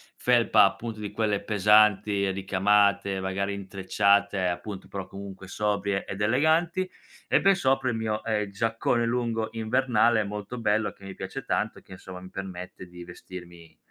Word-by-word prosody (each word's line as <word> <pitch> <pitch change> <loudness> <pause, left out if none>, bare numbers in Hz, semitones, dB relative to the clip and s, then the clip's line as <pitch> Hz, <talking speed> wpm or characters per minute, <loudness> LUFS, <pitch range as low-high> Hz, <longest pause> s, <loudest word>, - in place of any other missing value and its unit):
felpa, 120 -2 +4
appunto, 105 +3 -1
di 105 -1 -5
quelle 105 -1 0
pesanti, 105 -1 +3
ricamate, 100 +1 +2
magari 95 +1 -2
intrecciate, 100 0 +1
appunto, 90 +3 -5
però 95 -1 -6
comunque 95 -1 -9
sobrie 100 -1 -1
ed 95 +2 -6
eleganti, 160 - +2 0.4
e - - +3
per 195 +1 +5
sopra 135 -6 +1
il 120 - -1
mio, 110 -1 -2
ehm, 105 -2 -1
giaccone 115 +3 0
lungo 115 -2 -1
invernale 115 -1 +2
molto 105 +4 -6
bello 110 -1 +1
che 100 - -16
mi 95 -1 -8
piace - - -6
tanto, - - -1
e - - -21
che - - -14
insomma 95 0 -10
mi 95 - -11
permette 90 -1 -7
di 90 0 -11
vestirmi 85 -2 -12
105 Hz, 155 wpm, -26 LUFS, 95-115 Hz, 0.4 s, per